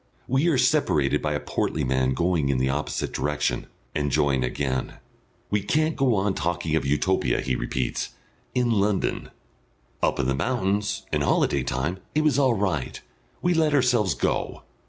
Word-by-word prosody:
We 135 Hz, +6 st, +2 dB
are 160 Hz, -6 st, +3 dB
separated 125 Hz, -, +2 dB
by -, -, -1 dB
a -, -, -1 dB
portly -, -, -2 dB
man 65 Hz, 0 st, +1 dB
going 85 Hz, -5 st, +1 dB
in 70 Hz, -, +2 dB
the 65 Hz, +1 st, +1 dB
opposite 75 Hz, +2 st, -3 dB
direction, 75 Hz, 0 st, -1 dB, 0.3 s
and 75 Hz, -1 st, 0 dB
join 70 Hz, -2 st, +2 dB
again. 65 Hz, +1 st, -2 dB, 0.6 s
"We 105 Hz, 0 st, +2 dB
can't 155 Hz, +9 st, +1 dB
go 130 Hz, -4 st, +2 dB
on 100 Hz, 0 st, +1 dB
talking 80 Hz, -1 st, -1 dB
of 80 Hz, -, 0 dB
Utopia," 85 Hz, +7 st, +1 dB
he 65 Hz, -1 st, -1 dB
repeats, 60 Hz, +1 st, -2 dB, 0.5 s
"in 125 Hz, -2 st, +2 dB
London.... 100 Hz, -2 st, 0 dB, 0.7 s
Up -, -, +1 dB
in 70 Hz, -, +1 dB
the 65 Hz, -, +1 dB
mountains 100 Hz, -, -1 dB
and 75 Hz, -, +2 dB
holiday 70 Hz, -1 st, +2 dB
time 70 Hz, +9 st, -2 dB, 0.2 s
it 155 Hz, -, +3 dB
was 145 Hz, -3 st, +3 dB
all 130 Hz, -4 st, +3 dB
right. 95 Hz, -, -2 dB, 0.4 s
We 175 Hz, 0 st, +3 dB
let 160 Hz, -3 st, +2 dB
ourselves 125 Hz, -7 st, +3 dB
go!" -, -, -2 dB
95 Hz, 165 wpm, -25 LUFS, -, 0.7 s, are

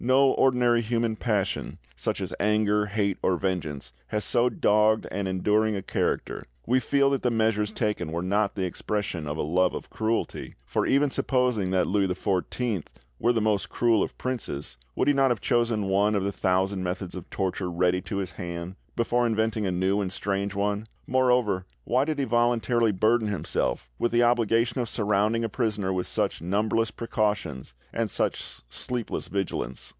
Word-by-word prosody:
No 130 Hz, +2 st, +5 dB
ordinary 125 Hz, -2 st, +3 dB
human 115 Hz, 0 st, 0 dB
passion, 105 Hz, -4 st, -1 dB, 0.2 s
such -, -, -2 dB
as -, -, -4 dB
anger, 105 Hz, 0 st, +2 dB
hate, 100 Hz, -2 st, -1 dB
or 90 Hz, -, +2 dB
vengeance, 80 Hz, -9 st, -3 dB
has 105 Hz, 0 st, -1 dB
so 120 Hz, +1 st, +3 dB
dogged 110 Hz, -1 st, +3 dB
and 100 Hz, -1 st, -2 dB
enduring 105 Hz, +3 st, +1 dB
a 95 Hz, -, -4 dB
character; -, -, -1 dB, 0.2 s
we 130 Hz, +2 st, +3 dB
feel 140 Hz, +3 st, +2 dB
that 135 Hz, -, 0 dB
the 125 Hz, -, +2 dB
measures 110 Hz, -2 st, +1 dB
taken 105 Hz, -8 st, -2 dB
were 85 Hz, +2 st, -2 dB
not 100 Hz, +2 st, +1 dB
the 95 Hz, -2 st, -1 dB
expression 90 Hz, -3 st, -3 dB
of 75 Hz, +1 st, -3 dB
a -, -, -1 dB
love 90 Hz, +5 st, +2 dB
of -, -, -7 dB
cruelty, 110 Hz, +1 st, -2 dB
for -, -, 0 dB
even 140 Hz, +1 st, +3 dB
supposing 125 Hz, -9 st, +1 dB
that 95 Hz, -1 st, +2 dB
Louis 100 Hz, 0 st, +1 dB
XIV 95 Hz, +2 st, -1 dB, 0.3 s
were 120 Hz, -, +3 dB
the 115 Hz, -2 st, +1 dB
most 105 Hz, -5 st, +1 dB
cruel 115 Hz, -3 st, +2 dB
of -, -, -3 dB
princes, 105 Hz, -, -4 dB, 0.2 s
would -, -, +1 dB
he 145 Hz, -, +5 dB
not 135 Hz, -1 st, +3 dB
have 120 Hz, -4 st, 0 dB
chosen 115 Hz, -3 st, +1 dB
one 100 Hz, +2 st, +2 dB
of 100 Hz, -, +1 dB
the 100 Hz, -, 0 dB
thousand 95 Hz, 0 st, 0 dB
methods 90 Hz, 0 st, -3 dB
of 90 Hz, -2 st, -8 dB
torture 95 Hz, -1 st, -2 dB
ready 90 Hz, +1 st, +1 dB
to 100 Hz, -, -4 dB
his 95 Hz, -2 st, -3 dB
hand 85 Hz, +2 st, -6 dB, 0.2 s
before 120 Hz, +1 st, +2 dB
inventing 110 Hz, -2 st, 0 dB
a -, -, 0 dB
new 95 Hz, +3 st, +1 dB
and 95 Hz, -2 st, -2 dB
strange 100 Hz, +1 st, -2 dB
one? 105 Hz, +2 st, -1 dB, 0.2 s
Moreover, 125 Hz, -7 st, +2 dB, 0.2 s
why 130 Hz, -, +2 dB
did 155 Hz, 0 st, -2 dB
he 140 Hz, -, 0 dB
voluntarily 120 Hz, -1 st, +2 dB
burden 110 Hz, +3 st, +2 dB
himself 95 Hz, -11 st, -2 dB
with 120 Hz, -, +1 dB
the 120 Hz, +1 st, +4 dB
obligation 115 Hz, 0 st, +2 dB
of 115 Hz, -, -3 dB
surrounding 105 Hz, +2 st, +1 dB
a 115 Hz, -, -1 dB
prisoner 105 Hz, -4 st, -1 dB
with 90 Hz, -1 st, -2 dB
such -, -, 0 dB
numberless 110 Hz, +5 st, +1 dB
precautions 105 Hz, -, -2 dB, 0.2 s
and 115 Hz, -1 st, -1 dB
such -, -, -2 dB
sleepless 125 Hz, -3 st, -4 dB
vigilance? 95 Hz, -10 st, -3 dB
105 Hz, 180 wpm, -26 LUFS, 95-115 Hz, 0.3 s, No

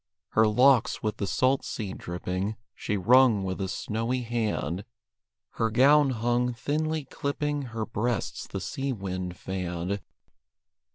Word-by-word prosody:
Her 110 Hz, 0 st, +4 dB
locks, 125 Hz, +2 st, +4 dB
with 110 Hz, 0 st, -1 dB
the 100 Hz, -, -2 dB
salt 130 Hz, +6 st, +2 dB
sea 100 Hz, -5 st, -4 dB
dripping, 90 Hz, +4 st, -3 dB, 0.2 s
She 105 Hz, -, -2 dB
wrung 115 Hz, +1 st, +5 dB
with 95 Hz, +1 st, -3 dB
a 95 Hz, -, -1 dB
snowy 115 Hz, +6 st, -2 dB
hand; 110 Hz, -7 st, -2 dB, 0.7 s
Her 115 Hz, -, 0 dB
gown 140 Hz, +5 st, +5 dB
hung, 120 Hz, 0 st, 0 dB
thinly 155 Hz, +3 st, -1 dB
clipping 145 Hz, +1 st, -2 dB
Her 110 Hz, -1 st, -3 dB
breasts 115 Hz, +1 st, -2 dB
the -, -, -5 dB
sea 135 Hz, 0 st, -2 dB
wind 90 Hz, -4 st, -4 dB
fanned. 90 Hz, +1 st, -3 dB
115 Hz, 130 wpm, -27 LUFS, 95-130 Hz, 0.7 s, wrung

